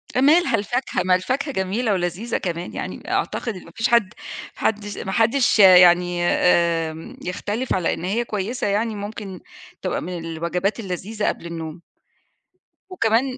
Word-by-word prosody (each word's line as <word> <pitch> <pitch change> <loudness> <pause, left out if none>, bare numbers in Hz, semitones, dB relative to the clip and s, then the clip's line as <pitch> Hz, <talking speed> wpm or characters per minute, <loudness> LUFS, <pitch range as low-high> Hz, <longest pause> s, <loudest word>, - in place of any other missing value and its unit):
مالها 305 +7 +4
الفاكهة 210 -2 -1
ما 185 -1 +4
الفاكهة 270 +10 -1
جميلة 200 +4 0
ولذيذة 185 +6 -2
كمان 175 -1 -4
يعني - - -6
أعتقد 230 -4 -1
إن 185 - -10
ما 170 - -14
فيش 225 +3 0
حد 235 -4 +3 0.4
حدش 205 -1 -2
ما 190 - -4
حدش 230 +2 +3
يعني 180 -2 +7
آمم، 165 -2 +1
يختلف 205 +7 -3
على 180 -3 +1
إن - - -6
هي 230 +5 0
كويّسة 210 +3 -2
يعني 215 +2 0
ممكن 205 -2 -7 0.4
تبقى - - -2
من 180 +1 -5
الوجبات 170 +6 -2
اللذيذة 205 +2 -3
قبل - - -2
النوم. 165 0 -6 1.1
وكمان 255 -5 +1
200 Hz, 145 wpm, -22 LUFS, 180-230 Hz, 1.1 s, يعني